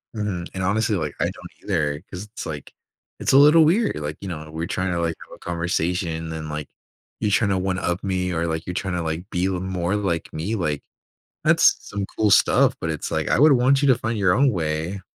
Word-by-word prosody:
Mhm. 100 Hz, -5 st, -3 dB
And, 95 Hz, -, -3 dB
honestly, 105 Hz, +3 st, +1 dB
like, 75 Hz, -6 st, -3 dB
I -, -, +2 dB
don't -, -, -6 dB
either 75 Hz, -1 st, 0 dB
'cause 90 Hz, +1 st, -6 dB
it's, 105 Hz, +1 st, -8 dB
like 75 Hz, -3 st, -7 dB, 0.5 s
it's -, -, +1 dB
a 135 Hz, -, +6 dB
little 150 Hz, +3 st, +7 dB
weird. 205 Hz, +8 st, +2 dB
Like, 75 Hz, +1 st, -4 dB
you 100 Hz, -, -6 dB
know, 75 Hz, -3 st, -6 dB
we're 80 Hz, +1 st, -3 dB
trying 90 Hz, 0 st, -1 dB
to, 85 Hz, -, -1 dB
like, 85 Hz, -1 st, -1 dB
have -, -, -11 dB
a -, -, -21 dB
conversation 85 Hz, -1 st, -2 dB
and, 80 Hz, -1 st, -6 dB
like, 75 Hz, -1 st, -4 dB, 0.5 s
you're 105 Hz, -2 st, 0 dB
trying 100 Hz, 0 st, +2 dB
to 95 Hz, -, +2 dB
one-up 90 Hz, -1 st, -1 dB
me 90 Hz, -2 st, -1 dB
or, 85 Hz, 0 st, -1 dB
like, 80 Hz, 0 st, -3 dB
you're 90 Hz, -, -3 dB
trying 95 Hz, 0 st, -2 dB
to, 90 Hz, -, -1 dB
like, 80 Hz, +4 st, -4 dB
be 90 Hz, +2 st, 0 dB
more 95 Hz, 0 st, -1 dB
like 90 Hz, -6 st, -2 dB
me. 95 Hz, +9 st, -2 dB
Like, 75 Hz, -7 st, -1 dB, 0.6 s
that's -, -, +5 dB
some 100 Hz, -1 st, -3 dB
cool 110 Hz, -1 st, +2 dB
stuff, -, -, +5 dB
but 80 Hz, -, -2 dB
it's 80 Hz, -, -4 dB
like, -, -, -1 dB
I -, -, +2 dB
would 150 Hz, +3 st, +7 dB
want 135 Hz, +1 st, +4 dB
you 140 Hz, -, +3 dB
to 130 Hz, -, +7 dB
find 115 Hz, -1 st, -2 dB
your 95 Hz, -3 st, +3 dB
own 135 Hz, +1 st, +4 dB
way. 80 Hz, 0 st, -2 dB
90 Hz, 230 wpm, -23 LUFS, 80-105 Hz, 0.6 s, little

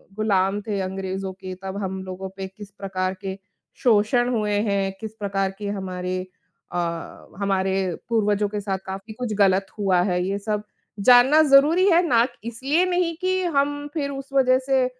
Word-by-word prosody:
गुलाम 200 Hz, -2 st, +1 dB
थे 205 Hz, -2 st, -1 dB
अंग्रेजों 190 Hz, 0 st, -4 dB
के 185 Hz, 0 st, -8 dB
तब 190 Hz, 0 st, -5 dB
हम 190 Hz, 0 st, -3 dB
लोगों 190 Hz, 0 st, -6 dB
पे 190 Hz, -, -4 dB
किस 200 Hz, +1 st, -12 dB
प्रकार 190 Hz, -1 st, -3 dB
के 195 Hz, -1 st, -4 dB, 0.5 s
शोषण 240 Hz, +2 st, +3 dB
हुए 210 Hz, -2 st, 0 dB, 0.2 s
हैं, 195 Hz, -1 st, 0 dB
किस 220 Hz, -1 st, -6 dB
प्रकार 195 Hz, -1 st, -1 dB
की 205 Hz, -, -5 dB
हमारे 185 Hz, -2 st, -3 dB, 0.5 s
अ, 175 Hz, -, -3 dB, 0.6 s
हमारे 195 Hz, -1 st, +1 dB, 0.4 s
पूर्वजों 210 Hz, -2 st, +2 dB
के 210 Hz, -, -3 dB
साथ 195 Hz, -1 st, -2 dB
काफ़ी 195 Hz, +3 st, -7 dB
कुछ 230 Hz, -1 st, -4 dB
गलत 195 Hz, -1 st, +4 dB
हुआ 190 Hz, -3 st, +3 dB
है 180 Hz, 0 st, +1 dB
ये 200 Hz, +1 st, -1 dB
सब 210 Hz, 0 st, -2 dB, 0.4 s
जानना 255 Hz, +5 st, +7 dB
ज़रूरी 305 Hz, +7 st, +6 dB
है 340 Hz, +1 st, +6 dB
ना 235 Hz, -5 st, +5 dB
क -, -, -10 dB
इसलिए 270 Hz, +9 st, +1 dB
नहीं 355 Hz, -2 st, 0 dB
कि 370 Hz, 0 st, +1 dB
हम 290 Hz, +1 st, +1 dB
फिर 285 Hz, -3 st, -2 dB
उस 275 Hz, 0 st, -7 dB
वज़ह 255 Hz, -2 st, +4 dB
से 265 Hz, -2 st, +3 dB
205 Hz, 170 wpm, -23 LUFS, 190-255 Hz, 0.6 s, जानना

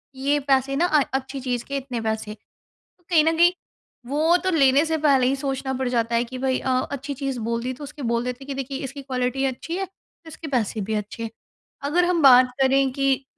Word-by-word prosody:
"ये 280 Hz, +2 st, +1 dB
पैसे 270 Hz, 0 st, +2 dB
ना 330 Hz, +5 st, +2 dB
अ, 310 Hz, -4 st, +3 dB
अच्छी 265 Hz, +1 st, -3 dB
चीज़ 245 Hz, -2 st, -2 dB
के 280 Hz, -, -3 dB
इतने 255 Hz, -3 st, -4 dB
पैसे।" 220 Hz, -1 st, -3 dB
तो -, -, -24 dB, 0.5 s
कहीं 325 Hz, -4 st, +5 dB
न 325 Hz, 0 st, +2 dB
कहीं 345 Hz, +1 st, +6 dB, 0.6 s
वो 310 Hz, +5 st, +3 dB
तो 375 Hz, -, +1 dB
लेने 280 Hz, -3 st, +4 dB
से 320 Hz, 0 st, 0 dB
पहले 280 Hz, -4 st, +3 dB
ही 270 Hz, -, +2 dB
सोचना 270 Hz, -1 st, -3 dB
पड़ 260 Hz, 0 st, -2 dB
जाता 235 Hz, -1 st, 0 dB
है 235 Hz, -, +2 dB
कि 250 Hz, +2 st, -8 dB
भाई 260 Hz, 0 st, 0 dB
अ, -, -, -3 dB, 0.2 s
अच्छी 280 Hz, +1 st, -4 dB
चीज़ 270 Hz, -2 st, -4 dB
बोल 230 Hz, 0 st, -1 dB
दी 255 Hz, +1 st, -2 dB
तो 270 Hz, -, -10 dB
उसको 285 Hz, 0 st, -8 dB
बोल 235 Hz, 0 st, 0 dB
देते 250 Hz, +2 st, -5 dB
हैं -, -, -14 dB
कि 280 Hz, -, -3 dB
देखिए, 270 Hz, +1 st, -5 dB
इसकी 275 Hz, +1 st, -6 dB
क्वालिटी 255 Hz, 0 st, -2 dB
अच्छी 270 Hz, +6 st, -3 dB
है 385 Hz, -, -2 dB
तो 375 Hz, -3 st, -27 dB
इसके 320 Hz, 0 st, -9 dB
पैसे 230 Hz, -6 st, -1 dB
भी 220 Hz, -, -2 dB
अच्छे 210 Hz, +2 st, -4 dB
हैं। 225 Hz, -, -3 dB, 0.6 s
अगर 350 Hz, +4 st, +3 dB
हम 350 Hz, -2 st, +1 dB
बात 255 Hz, -2 st, +7 dB
करें 270 Hz, 0 st, +3 dB
कि 275 Hz, 0 st, 0 dB
270 Hz, 235 wpm, -23 LUFS, 250-285 Hz, 0.6 s, बात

